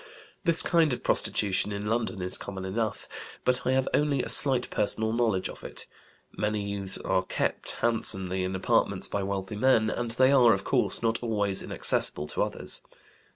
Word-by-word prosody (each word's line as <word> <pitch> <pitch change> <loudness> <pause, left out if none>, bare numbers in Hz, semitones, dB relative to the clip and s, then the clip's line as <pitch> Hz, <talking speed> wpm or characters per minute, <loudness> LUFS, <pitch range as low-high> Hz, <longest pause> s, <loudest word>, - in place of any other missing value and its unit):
This 170 -2 +8
kind 165 -5 +2
of - - -6
prostitution 100 0 +1
in 100 0 -5
London 110 -3 -2
is 90 - -1
common 95 -1 -6
enough, 110 +3 -3 0.4
but 125 0 0
I 130 - +2
have 130 0 0
only 145 -3 +1
a - - -5
slight 130 -3 +5
personal 110 +1 +1
knowledge 110 -6 0
of - - -12
it. - - -7 0.5
Many 105 -1 -3
youths 100 -1 -4
are 95 -1 -1
'kept' - - -3
handsomely 95 -5 -1
in 95 +1 -3
apartments 95 - 0
by 100 - -3
wealthy 95 +1 -4
men, 110 -2 +2
and 120 -1 -4
they 130 +3 +3
are, 125 -4 +5
of 95 0 -3
course, - - -1
not 115 0 0
always 105 -4 0
inaccessible 75 - 0
to - - -3
others. - - -1
110 Hz, 175 wpm, -27 LUFS, 95-120 Hz, 0.5 s, This